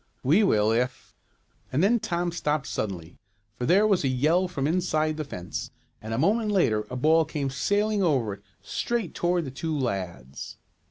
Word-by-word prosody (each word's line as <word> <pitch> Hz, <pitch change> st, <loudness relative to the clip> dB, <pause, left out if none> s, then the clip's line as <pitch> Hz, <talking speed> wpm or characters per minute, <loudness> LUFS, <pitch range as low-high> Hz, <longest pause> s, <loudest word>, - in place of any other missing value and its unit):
"We 160 Hz, +12 st, +4 dB
will, 110 Hz, -, +3 dB
if 125 Hz, +3 st, -2 dB, 0.3 s
" -, -, -38 dB
and 140 Hz, +6 st, +1 dB
then 235 Hz, +4 st, +4 dB
Tom 175 Hz, -3 st, -1 dB
stopped 150 Hz, -4 st, -1 dB
suddenly, 90 Hz, -5 st, -5 dB, 0.3 s
for 125 Hz, +3 st, -4 dB
there 195 Hz, +5 st, +5 dB
was 200 Hz, -6 st, +2 dB
a -, -, +2 dB
yell 155 Hz, +8 st, +2 dB
from 140 Hz, -6 st, -3 dB
inside 155 Hz, -2 st, +1 dB
the 155 Hz, -, -3 dB
fence 90 Hz, -, -6 dB, 0.3 s
and 110 Hz, -, -7 dB
a 115 Hz, -, -1 dB
moment 210 Hz, -, +2 dB
later 110 Hz, -, +2 dB
a 125 Hz, -, -5 dB
ball 160 Hz, +5 st, +4 dB
came 145 Hz, -3 st, -3 dB
sailing 205 Hz, +9 st, +1 dB
over 135 Hz, -, +1 dB
it, 100 Hz, -, -11 dB, 0.2 s
straight 235 Hz, -7 st, -2 dB
toward 175 Hz, -1 st, 0 dB
the 135 Hz, -, -6 dB
two 155 Hz, +3 st, -3 dB
lads. 90 Hz, -, -4 dB
150 Hz, 180 wpm, -26 LUFS, 120-180 Hz, 0.3 s, there